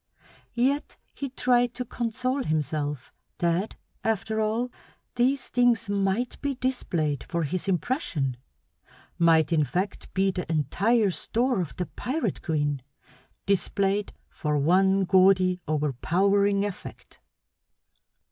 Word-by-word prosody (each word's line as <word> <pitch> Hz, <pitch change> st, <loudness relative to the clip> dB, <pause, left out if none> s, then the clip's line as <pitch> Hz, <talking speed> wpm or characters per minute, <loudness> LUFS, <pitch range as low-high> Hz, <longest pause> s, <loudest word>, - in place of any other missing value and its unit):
Yet 270 Hz, +4 st, 0 dB, 0.2 s
he 275 Hz, -, -5 dB
tried 245 Hz, -1 st, +2 dB
to 250 Hz, -, -3 dB
console 250 Hz, +4 st, -2 dB
himself 150 Hz, -, -2 dB, 0.2 s
that 175 Hz, +4 st, 0 dB, 0.3 s
after 220 Hz, 0 st, 0 dB
all 225 Hz, +3 st, 0 dB, 0.4 s
these 250 Hz, +2 st, +1 dB
things 240 Hz, -3 st, +2 dB
might 200 Hz, +4 st, -1 dB
be 280 Hz, -2 st, -1 dB
displayed 170 Hz, -, -1 dB
for 170 Hz, -1 st, -2 dB
his 180 Hz, +6 st, -3 dB
impression; 170 Hz, -, -1 dB, 0.8 s
might 165 Hz, -2 st, +4 dB
in 155 Hz, -2 st, +4 dB
fact 185 Hz, +7 st, -3 dB
be 195 Hz, 0 st, +3 dB
the 180 Hz, -3 st, -4 dB
entire 195 Hz, -, +2 dB
store 240 Hz, +3 st, 0 dB
of 170 Hz, -, -5 dB
the 180 Hz, -, -2 dB
pirate 250 Hz, -, -3 dB
queen, 145 Hz, -3 st, -1 dB, 0.6 s
displayed 200 Hz, +1 st, 0 dB, 0.2 s
for 150 Hz, -1 st, -2 dB
one 190 Hz, +6 st, +3 dB
gaudy, 185 Hz, -1 st, +4 dB
overpowering 190 Hz, +8 st, +2 dB
effect. 205 Hz, -3 st, -8 dB
195 Hz, 110 wpm, -26 LUFS, 165-240 Hz, 0.8 s, might